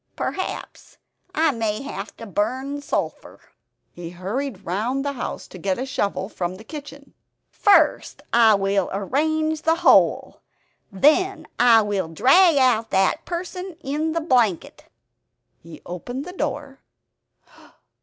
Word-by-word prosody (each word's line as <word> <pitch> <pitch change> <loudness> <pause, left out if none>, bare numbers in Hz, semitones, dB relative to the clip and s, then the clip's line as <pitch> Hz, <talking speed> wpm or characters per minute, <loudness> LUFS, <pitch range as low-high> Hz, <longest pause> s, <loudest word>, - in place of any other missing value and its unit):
Perhaps 375 - -5 0.4
I 315 0 +3
may 225 -2 -2
have 205 -8 -7
to 230 - -9
burn 260 - -2
sulphur." - - -4 0.5
He 175 -1 -8
hurried 200 +5 -5
round 235 +10 -2
the 285 - 0
house 255 - -6
to 185 - -11
get 190 +1 -1
a 255 - -3
shovel 200 -7 -2
from 180 -3 -4
the 205 - -12
kitchen 285 +1 -10 0.4
"First 410 -1 +2
I 225 -2 +6
will 195 -1 0
arrange 310 +10 -1
the 325 +1 +2
hole - - +3 0.5
then 310 - +2
I 230 -2 +6
will 200 -4 -2
drag 275 - +4
out 240 -4 +3
that 190 -1 +1
person 360 0 -6
in 300 +4 -2
the 330 - -1
blanket... 245 - 0 0.4
." - - -51
He 165 -1 -13
opened 245 - -6
the 360 - -8
door. - - -4
245 Hz, 135 wpm, -22 LUFS, 195-305 Hz, 0.5 s, I